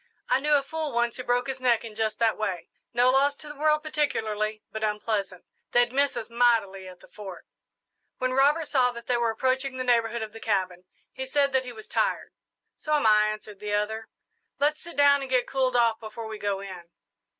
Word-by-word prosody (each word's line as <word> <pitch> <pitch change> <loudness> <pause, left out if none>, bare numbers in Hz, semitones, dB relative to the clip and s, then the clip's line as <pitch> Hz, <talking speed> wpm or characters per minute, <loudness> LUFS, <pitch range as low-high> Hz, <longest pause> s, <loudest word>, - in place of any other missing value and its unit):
"I - - +3
knew 300 +2 +1
a 280 - +2
fool 310 -1 -4
once 235 0 0
who 250 - -5
broke 245 0 +1
his 265 -1 -4
neck 240 -3 +2
in 225 - -8
just 220 0 -1
that 225 -2 +2
way. 190 -6 -3 0.2
No 245 +1 +4
loss 280 +2 +3
to 300 - -12
the 295 - -8
world 305 +1 +2
particularly, 215 -8 -1
but 220 0 -5
unpleasant. 210 -3 -2 0.3
They'd 240 0 +3
miss 280 +1 +2
us 220 - -4
mightily 230 -6 +1
at 180 -1 -12
the - - -16
Fort." 195 -4 -10 0.7
When 255 0 -1
Robert 290 +4 +3
saw 255 -4 +3
that 235 0 -9
they 250 - +1
were 235 -1 +1
approaching 260 +3 -1
the 255 - -2
neighbourhood 235 -2 +1
of 215 -1 -8
the 225 - -9
cabin, 185 -5 -1 0.3
he 265 0 -5
said 280 0 +1
that 260 -1 +2
he 250 - -6
was 220 -2 -11
tired. - - -1 0.4
"So 305 0 -1
'm 290 - +1
I," 215 -1 +5
answered 215 -1 -6
the 210 0 -4
other. 220 +2 -2 0.5
"Let's 295 +2 +1
sit 340 - -11
down 285 -1 +5
and 270 - -5
get 255 -1 +2
cooled 260 -2 0
off 230 -2 +3
before 225 +1 -8
we 220 -1 -7
go 200 -1 -2
in." 185 -3 -8
235 Hz, 215 wpm, -26 LUFS, 215-270 Hz, 0.7 s, I